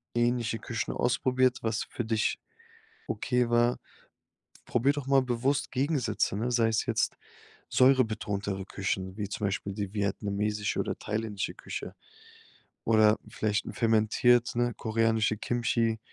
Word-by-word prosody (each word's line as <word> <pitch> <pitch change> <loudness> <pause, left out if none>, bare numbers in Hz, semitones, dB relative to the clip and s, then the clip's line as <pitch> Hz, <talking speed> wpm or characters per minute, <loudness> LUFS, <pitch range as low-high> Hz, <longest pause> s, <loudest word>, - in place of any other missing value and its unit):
ähnliche 120 -2 +1
Küchen 115 -1 -3
ausprobiert, 125 0 +1
was 110 0 -1
für 120 - -5
dich 110 -1 0 0.7
okay 125 -2 0
war. 120 +1 +3 0.9
Probier 130 +4 +2
doch 140 -2 -5
mal 135 -1 +5
bewusst 130 +3 0
Gegensätze, 125 -7 0
ne? 120 +3 -1
Sei 115 -2 +3
es 110 - 0
jetzt - - 0 0.5
säurebetontere 105 -7 +2
Küchen 95 0 -3
wie 105 -2 -2
zum 100 0 -2
Beispiel 100 0 -3
die 100 -1 -4
vietnamesische 105 0 -1
oder - - -2
thailändische 105 -2 -3
Küche. - - -7 0.9
Oder 110 -1 +5
vielleicht 105 -1 -1
'n - - -6
fermentiert, 115 +2 +3
ne? 120 0 +1
Koreanische 110 -1 +1
Kimchi, 115 -1 0
115 Hz, 125 wpm, -29 LUFS, 105-120 Hz, 0.9 s, mal